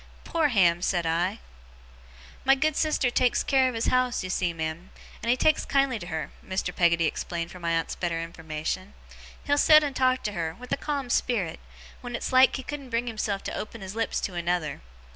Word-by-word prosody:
'Poor 325 -2 +1
Ham!' 175 -9 +3
said 175 -2 0
I. 175 +6 0 1.1
'My 270 +1 +5
good 305 +2 +1
sister 305 -6 +1
takes 250 0 +2
care 265 -2 +3
of 250 - -6
his 225 - -1
house, 255 -3 +1
you 185 - -4
see, 180 -1 0
ma'am, 160 +2 -5 0.3
and 230 - -3
he 245 - +4
takes 310 +4 +3
kindly 275 -4 +1
to 175 - -8
her,' 160 -4 -4
Mr. 185 -1 -3
Peggotty 170 -1 +3
explained 170 +1 -3
for 180 - -10
my 170 -1 -2
aunt's 165 0 0
better 170 -2 -2
information. 165 +3 -5 0.5
'He'll 285 0 +2
set 305 0 +7
and 285 -2 -3
talk 255 0 +2
to 210 - -1
her, 165 -4 -3
with 250 +1 -11
a - - +3
calm 280 -4 -3
spirit, 200 -12 0 0.4
wen 245 -1 -5
it's 245 - -4
like 260 +1 +6
he 265 - -5
couldn't 280 -2 -7
bring 230 0 0
himself 215 -4 -2
to - - -4
open 225 +1 -6
his 190 0 -6
lips 225 +1 -1
to 190 - -3
another. 175 -4 -2
205 Hz, 205 wpm, -27 LUFS, 170-255 Hz, 1.1 s, set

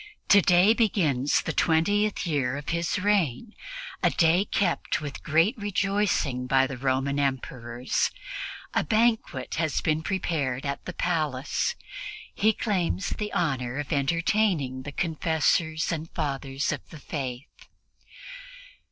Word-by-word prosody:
Today 190 +1 +6
begins 160 - +2
the 165 - -2
twentieth 205 +8 +2
year 140 -5 0
of 145 - -6
his 170 +2 0
reign, 200 - +1 0.5
a - - +4
day 170 +3 +3
kept 195 -3 0
with 145 -2 -6
great 165 - +3
rejoicing 195 -10 0
by 135 +1 +4
the 135 0 -5
Roman 135 +2 0
Emperors. 125 -3 -1 0.6
A - - +2
banquet 215 - +1
has 160 -3 +1
been 155 0 0
prepared 155 -8 -2
at 140 0 -3
the 180 - -5
palace; 155 -7 -1 0.6
he 215 +2 +3
claims 180 - -1
the 210 -1 -3
honor 130 -5 -1
of 145 +2 -3
entertaining 160 -2 +1
the 145 +2 -7
Confessors 160 0 +1
and 160 -1 -4
Fathers 135 -1 -2
of - - -3
the 160 - -10
Faith. 135 -2 -6
155 Hz, 125 wpm, -26 LUFS, 135-185 Hz, 0.6 s, Today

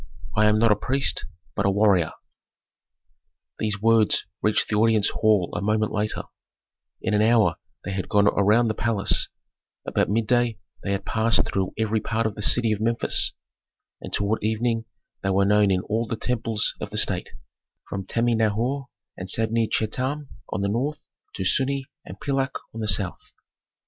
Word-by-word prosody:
I 105 +1 +4
am 105 0 +4
not 115 0 +4
a - - +5
priest, 135 +6 0 0.3
but 100 - +1
a - - +4
warrior." 100 -4 +3 1.5
These 105 -1 -1
words 115 -2 +3 0.2
reached 105 0 +2
the 105 - 0
audience 110 -1 +3
hall 105 -5 +2
a - - -2
moment 105 +1 +1
later; 105 0 -2 0.8
in - - 0
an 105 - +3
hour 115 0 +3 0.3
they 95 - -3
had 95 -1 -4
gone 100 0 +4
around 105 +5 +3
the 110 - 0
palace; 110 -3 +1 0.6
about - - 0
midday 115 +2 +1 0.2
they 100 - -2
had 100 0 -3
passed 115 +1 +2
through 95 -2 -2
every 110 0 0
part 115 +1 -1
of 110 - -1
the 105 - -7
city 115 +2 +3
of 105 -1 -1
Memphis, 115 +1 +1 0.7
and - - -8
toward 105 +1 0
evening 115 +1 0 0.4
they 95 - -1
were 95 +1 +3
known 105 0 +4
in 95 -1 +2
all 110 +4 -2
the 115 - -2
temples 115 -2 -1
of - - -4
the - - -6
state, - - 0 0.6
from 100 -1 -4
Tami 120 +3 +1
n 110 - +4
hor 130 +5 -2 0.3
and 95 0 -7
Sabne 115 +2 +2
Chetam 130 +6 -2 0.2
on - - -2
the 100 - 0
north 135 +9 -2 0.3
to 95 - -3
Sunnu 135 +6 +2 0.2
and - - -10
Pilak 135 -1 -1 0.2
on 115 - -7
the 110 - -2
south. 95 -2 -1
110 Hz, 175 wpm, -24 LUFS, 100-115 Hz, 1.5 s, a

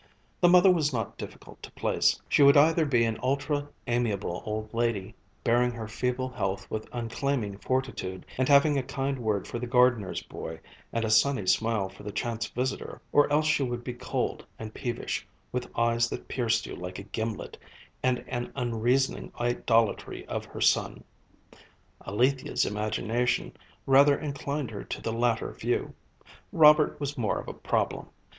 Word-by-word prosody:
The 175 - +5
mother 180 +1 +7
was 155 -5 +2
not 115 -5 -3
difficult - - -10
to - - -10
place; - - +1
she - - +3
would 140 0 +8
either 160 +2 +5
be 120 -4 +3
an 110 -1 -2
ultra 145 +2 0 0.2
amiable 110 -7 -1
old 110 +1 -4
lady, 115 -3 -1 0.3
bearing 120 +1 +3
her 115 -2 -6
feeble 125 +3 -2
health 95 -5 -3
with 110 0 -4
uncomplaining 115 -3 -2
fortitude, 130 -9 -2
and 130 - +2
having 145 0 +5
a - - 0
kind 135 +1 -3
word 105 -4 -1
for 120 - -4
the 125 - -4
gardener's 120 -5 +2
boy 80 0 -7 0.3
and 115 -1 -1
a 110 - -1
sunny 110 -1 +3
smile 110 0 +2
for 95 - -14
the 105 - -6
chance 115 +1 -2
visitor, 130 +2 -3
or 145 0 +4
else 150 +1 +3
she 150 -1 +2
would 120 -2 -2
be 125 - -4
cold 120 - -3
and 110 -1 -7
peevish, 120 -2 -3 0.2
with 125 0 -3
eyes 115 0 +2
that - - -6
pierced 115 -3 0
you - - -7
like 90 +1 -7
a 100 - -7
gimlet, 110 +2 -4 0.5
and 125 -1 0
an 120 0 -4
unreasoning 125 +1 0
idolatry 115 -2 +1
of - - -4
her - - -9
son. - - +2 1.0
Alethia's 125 +7 +1
imagination 110 +3 -1 0.3
rather 140 +1 +6
inclined 140 -3 -4
her 100 - -6
to - - -5
the 115 - -3
latter 115 -1 0
view. - - -2 0.6
Robert 150 -1 +6
was 145 -1 -4
more 110 -4 0
of - - -9
a - - -5
problem. - - -1
120 Hz, 165 wpm, -28 LUFS, 110-140 Hz, 1.0 s, would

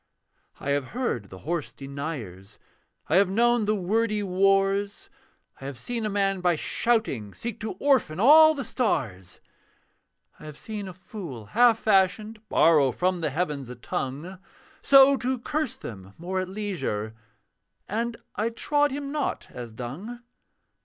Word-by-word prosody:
I 140 - -3
have 140 -2 0
heard 120 - -2
the 95 - -10
hoarse 155 -8 -3
deniers, 135 - -7 0.5
I 160 - +3
have 195 -1 +4
known 235 +2 +2
the 215 +1 +1
wordy 210 +2 0
wars; 195 +1 +1 0.5
I - - -8
have 135 -2 -6
seen 230 - -3
a - - -2
man, 195 -2 0
by 175 -1 +2
shouting, 155 - 0
Seek 235 -2 -5
to 220 - -4
orphan 260 - +1
all 310 +7 +8
the 275 - -3
stars. 110 - -2 1.0
I - - -12
have 150 -1 -9
seen 210 -3 -6
a 185 - -8
fool 175 - -9
half 235 0 +5
fashioned 215 +1 +1
Borrow 150 -5 +4
from 180 +4 -1
the 160 - 0
heavens 145 -4 -3
a 125 - -7
tongue, 145 +9 -5 0.4
So 275 0 +7
to 260 +1 -1
curse 305 +2 -3
them 95 -3 -10
more 185 +3 -3
at 185 0 -3
leisure 160 - -3 0.7
And 230 +3 -2 0.2
I 220 +2 0
trod 290 +5 +1
him 280 0 -5
not 295 -2 -3
as 120 -2 -8
dung. 165 - -7
190 Hz, 150 wpm, -26 LUFS, 140-230 Hz, 1.0 s, all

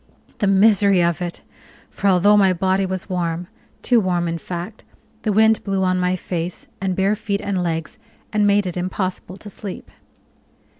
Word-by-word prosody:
The 205 - +1
misery 200 -2 +4
of 170 0 0
it! 175 -1 -5 0.5
for 200 - -2
although 195 +2 +5
my 195 -2 +4
body 190 +2 +1
was 185 -1 -4
warm 175 -2 -2 0.4
too 245 -2 +4
warm, 175 -4 0
in 165 0 -3
fact 180 +6 -7 0.4
the 215 - 0
wind 220 +2 +4
blew 195 -1 -1
on 185 0 +1
my 180 0 +1
face 175 -1 -5 0.2
and 190 -1 -1
bare 195 +3 +2
feet 205 -2 -2
and 195 -3 -2
legs, 165 -2 -3 0.3
and 210 -1 +3
made 205 0 +3
it 180 - -4
impossible 185 +1 -3
to 205 - -10
sleep. 200 -2 -8
190 Hz, 170 wpm, -21 LUFS, 180-200 Hz, 0.5 s, although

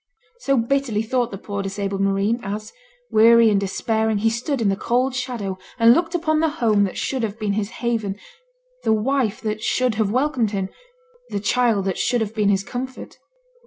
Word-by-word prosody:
So 275 - +1
bitterly 235 -2 0
thought 240 +1 0
the 195 - -7
poor 200 0 -5
disabled 195 0 -3
marine, 195 +4 +1
as, 210 +2 -5 0.4
weary 230 +1 +6
and 200 - +3
despairing, 220 +2 0
he 225 +2 +2
stood 250 +4 -2
in 215 -3 +2
the 195 - +1
cold 250 +5 0
shadow 235 -7 -4 0.2
and 230 0 +7
looked 335 +4 0
upon 315 -2 +1
the 320 0 +2
home 220 -9 +2
that 190 - -5
should 265 -2 -2
have 220 -1 -3
been 210 -2 -1
his 205 0 -2 0.2
haven, 220 -4 -1 0.7
the 220 - +3
wife 235 0 0
that 215 -1 -3
should 255 +1 +1
have 210 - +1
welcomed 255 -1 +1
him, 195 -2 -3 0.6
the 200 - -2
child 220 -1 +1
that 190 -2 -2
should 245 -2 +1
have 220 -1 -2
been 210 -2 +1
his 195 -1 +2
comfort. 255 +4 -7
220 Hz, 190 wpm, -22 LUFS, 200-250 Hz, 0.7 s, and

